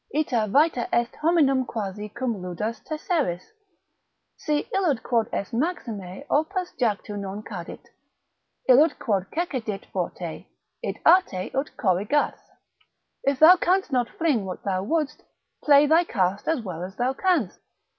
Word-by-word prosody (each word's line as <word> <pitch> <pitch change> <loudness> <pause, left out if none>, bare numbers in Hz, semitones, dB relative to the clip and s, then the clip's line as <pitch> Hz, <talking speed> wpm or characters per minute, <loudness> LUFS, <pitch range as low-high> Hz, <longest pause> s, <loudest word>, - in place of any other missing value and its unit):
Ita 250 - 0
vita 280 +2 +2
est 235 0 0
hominum 300 -5 +3
quasi 210 -3 -5
cum 230 -2 -3
ludas 210 +6 -4
tesseris, 305 - -1 0.9
Si 300 -1 -1
illud 325 - +1
quod 230 -3 +1
est 200 - -4
maxime 230 - -3
opus 355 +5 -1
jactu 210 -3 -1
non 200 +1 -6
cadit, 180 -7 -8 0.8
Illud 285 +5 +5
quod 195 -5 -1
cecidit 250 - -3
forte, 175 -2 -4 0.3
id - - -4
arte 325 - +4
ut 270 +3 -3
corrigas; 205 +8 +1 0.9
If 275 -1 +2
thou 330 +6 +8
canst 370 -1 +1
not 245 -3 +1
fling 300 -10 0
what 185 -1 -6
thou 190 -2 -1
wouldst, 300 +6 -1 0.4
play 290 0 +6
thy 320 +4 +4
cast 195 - -1
as 320 -6 +1
well 175 -5 -6
as 190 +1 -7
thou 250 +2 0
canst. 330 - 0
245 Hz, 135 wpm, -25 LUFS, 200-310 Hz, 0.9 s, thou